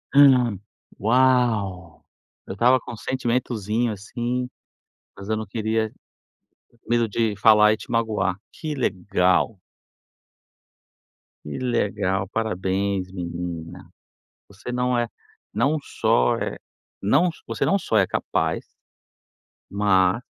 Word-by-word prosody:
Hum. 125 -8 +6 0.4
Uau! 110 -7 +1 0.4
Eu - - -5
estava 125 +5 +4
com 120 - -9
um - - -8
sentimentozinho, 120 -3 -1
assim, 120 +5 -3 0.7
mas 100 +2 -9
eu 110 - +1
não 110 0 -4
queria 110 +1 -1 1.0
medo 120 -2 +2
de 110 -1 0
falar 105 +1 +6
e - - -3
te - - -12
magoar. 105 -5 0 0.2
Que 155 -2 -5
legal! 95 -3 +1 1.9
Que 75 - -6
legal! 100 -6 0
Parabéns, 95 -2 -1
menina. 85 -1 -6 0.6
Você 100 +5 -8
não 125 0 0
é 120 -1 0 0.5
não 140 +8 +2
só 60 - +1
é - - -3 0.4
não 135 - +3 0.2
você - - -1
não 195 - +3
só 110 - 0
é 95 - +5
capaz - - -2 1.0
mas, 100 +1 +3
110 Hz, 110 wpm, -23 LUFS, 95-120 Hz, 1.9 s, Hum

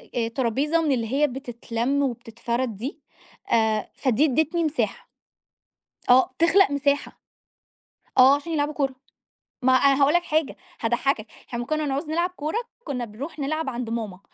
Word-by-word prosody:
أ 230 -2 +1
طرابيزة 275 +6 +1
من 310 -3 +1
اللي 235 -4 0
هي 295 +2 +3
بتتلَم 245 0 -2
وبتتفرد 235 -1 -3
دي 260 +10 -6 0.5
آآ، 220 -2 +2
فدي 260 +2 +2
ادّتني 315 +4 +1
مساحة. 310 -1 -2 1.0
آه، 260 +1 +6
تخلَق 335 +1 +5
مساحة، 285 0 0 1.0
آه 265 +2 +8
عشان 290 +4 -5
يلعبوا 295 -1 0
كورة 270 -3 -1 0.7
ما 260 +1 +5
أنا 275 +1 +4
هقول 285 +2 +4
لك 350 0 +3
حاجة 315 -4 0 0.3
هاضحكك، 235 0 0 0.2
إحنا 240 - -5
أمّا 240 - -3
كنَّا 310 +2 -1
نعوز 285 +3 -2
نلعب 345 +3 +1
كورة 315 +1 -4 0.3
كنَّا 250 - -3
بنروح 255 +9 -8
نلعب 310 +1 -1
عند 240 -2 -4
ماما. 220 -5 -4
275 Hz, 150 wpm, -24 LUFS, 240-305 Hz, 1.0 s, آه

